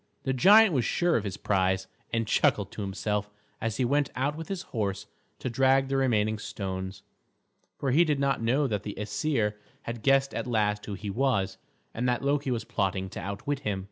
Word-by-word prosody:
The 135 - 0
giant 200 - +7
was 130 -4 +2
sure 175 +6 +1
of 110 - +1
his 100 -1 -4
prize, 95 -1 +1 0.3
and 115 0 0
chuckled 100 -2 +2
to - - -6
himself 105 +1 -2 0.3
as 115 -1 -2
he 130 - +2
went 145 +2 +2
out 140 +3 0
with 165 +1 -7
his 190 -2 -4
horse 100 -3 -2 0.3
to - - -5
drag 135 +2 +3
the 135 - +1
remaining 110 -5 +1
stones; 95 -2 -5 0.7
for 135 - -1
he 160 +7 +6
did 150 -4 0
not 140 -3 +1
know 130 +6 +2
that 105 -6 -1
the 105 -1 -6
Æsir 105 +1 0 0.3
had 115 -1 -5
guessed 135 +2 +3
at - - -3
last 105 -3 0
who 105 - -4
he 100 +1 -5
was, 120 -5 0 0.3
and 125 +2 0
that 120 +1 0
Loki 140 0 +1
was 120 -3 -1
plotting 95 -5 -1
to - - -6
outwit 100 +10 -3
him. 105 -8 -2
115 Hz, 200 wpm, -28 LUFS, 105-135 Hz, 0.7 s, giant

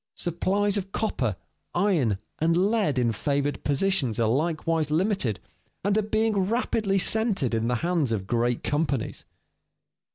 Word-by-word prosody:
Supplies 195 +4 0
of 195 -1 -4
copper, 125 - -1 0.4
iron, 170 - +2 0.2
and 165 +2 +2
lead 195 - +2
in 120 -2 +2
favored 140 +6 -1
positions 145 - +1
are 115 - +3
likewise 155 +4 0
limited, 155 - 0 0.4
and 200 +1 +1
are 215 - +3
being 215 +1 0
rapidly 205 -1 0
centered 195 - +1
in 115 0 0
the 125 - +1
hands 170 -8 +1
of 100 -4 -1
great 120 +3 0
companies. 145 -2 -2
165 Hz, 135 wpm, -26 LUFS, 125-200 Hz, 0.4 s, are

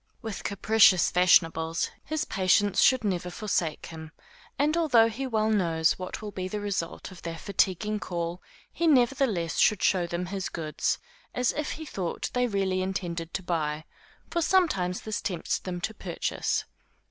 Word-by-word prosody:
With 220 -4 -5
capricious 200 -2 +4
fashionables, 165 -2 +3
his 310 0 -2
patience 195 +1 +2
should 260 -3 +5
never 180 -3 -1
forsake 180 -5 -2
him; 160 -1 -9 0.4
and 295 +3 +2
although 255 -9 +4
he 265 +4 -4
well 220 -2 +1
knows 165 -6 +2
what 185 +3 -6
will 210 - -5
be 185 -1 -4
the 210 +3 -4
result 200 -3 -4
of 185 - -12
their 165 -1 -5
fatiguing 200 +3 0
call, 170 -2 -4 0.3
he 340 - 0
nevertheless 245 - +2
should 210 -4 +3
show 180 -3 +2
them 175 +1 -3
his 190 +1 -4
goods, 155 -2 -2 0.4
as 250 -1 +2
if 300 0 -3
he 315 - -7
thought 185 - -4
they 250 0 +2
really 195 -3 0
intended 175 -3 -3
to 190 - -3
buy; 155 -3 -2 0.5
for 340 - 0
sometimes 305 - +2
this 215 -1 -3
tempts 175 -4 -2
them 180 -2 -5
to 220 - -2
purchase. 185 -5 -2
190 Hz, 160 wpm, -27 LUFS, 170-220 Hz, 0.5 s, should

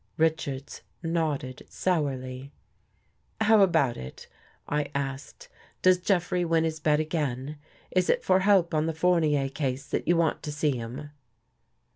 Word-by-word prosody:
Richards 155 -4 -1 0.2
nodded 155 -6 -2
sourly. 135 -6 -2 0.4
" - - -42
How 220 -1 +5
about 160 -10 +3
it? 65 0 -9 0.2
" - - -33
I 150 -1 -1
asked. 135 0 -5 0.2
" - - -32
Does 185 -1 +5
Jeffrey 180 -1 +1
win 165 -1 +2
his 160 -1 -2
bet 150 -1 +2
again? 150 -3 -2 0.3
Is 185 -1 +1
it - - +2
for 185 0 +4
help 190 -3 +3
on 155 0 +1
the 165 - -2
Fournier 160 -5 +2
case 135 -1 -3
that - - -2
you 175 0 +4
want 165 -2 +1
to 150 - -5
see 150 -1 0
him? 125 +5 -7
155 Hz, 155 wpm, -27 LUFS, 140-170 Hz, 0.4 s, How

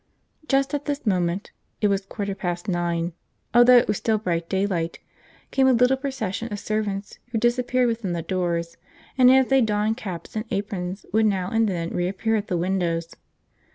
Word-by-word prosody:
Just 275 +1 +2
at 290 0 -2
this 290 -2 -3
moment 180 -1 0 0.3
it 210 - +3
was 195 -1 0
quarter 200 -2 -3
past 175 -1 -4
nine, 175 -2 -1 0.4
although 240 +1 +8
it 240 - +4
was 210 - 0
still 220 -1 +1
bright 170 -5 -2
daylight 190 -4 -1 0.5
came 265 -1 +3
a 260 - +5
little 250 +2 +4
procession 260 -5 -4
of 205 - -3
servants 205 -2 -3
who 245 -2 -3
disappeared 245 +2 +2
within 225 -6 -2
the 170 -1 -3
doors, 170 -2 -2 0.4
and, 255 -1 +6
as 260 0 +5
they 270 -1 +5
donned 215 0 +1
caps 185 -8 -7
and 215 +1 -2
aprons, 195 -2 -3
would 220 0 +4
now 190 -3 -1
and 225 -1 +2
then 170 -2 -3
reappear 190 +5 0
at 210 -1 -2
the 180 - -1
windows. 170 -2 -1
205 Hz, 180 wpm, -24 LUFS, 180-240 Hz, 0.5 s, although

